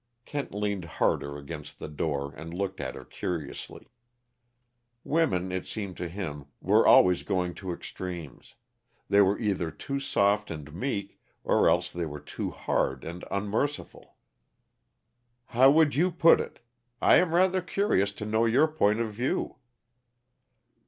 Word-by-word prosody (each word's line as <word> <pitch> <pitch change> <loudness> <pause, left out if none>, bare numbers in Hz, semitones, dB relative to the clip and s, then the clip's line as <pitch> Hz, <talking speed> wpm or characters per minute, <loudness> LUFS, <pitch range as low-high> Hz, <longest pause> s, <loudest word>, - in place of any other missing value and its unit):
Kent 145 -1 -4
leaned 100 -3 -2
harder 70 -3 -1
against 75 +1 -8
the - - -7
door, 70 -2 -3
and 80 +3 -9
looked 95 0 -3
at 65 -2 -4
her - - -10
curiously. 80 +2 -6 1.1
Women, 95 - +1
it 95 -1 -3
seemed 100 -4 -5
to 90 - -4
him, 80 -6 -5
were - - +4
always 90 -1 +6
going 90 -2 -1
to 95 -2 -4
extremes; 85 -4 -7 0.5
they 100 +1 +6
were 100 +1 +3
either 100 -7 -1
too 140 - -4
soft 105 -5 +1
and 75 -2 -7
meek, 100 +2 -3 0.2
or - - +4
else - - +1
they 85 -1 -3
were 75 0 -7
too - - -5
hard 65 -1 -1
and 85 +2 -7
unmerciful. 105 +9 -3 1.3
"How 130 +4 +5
would 150 0 +4
you 175 +6 +3
put 170 -1 +5
it? - - -9 0.4
I - - +6
am 170 -2 +2
rather 185 +1 +3
curious 180 - +1
to 105 - -6
know 110 +2 +2
your 125 +7 +4
point 110 -9 +1
of 110 -2 -2
view." 120 +5 -2
100 Hz, 145 wpm, -28 LUFS, 85-125 Hz, 1.3 s, always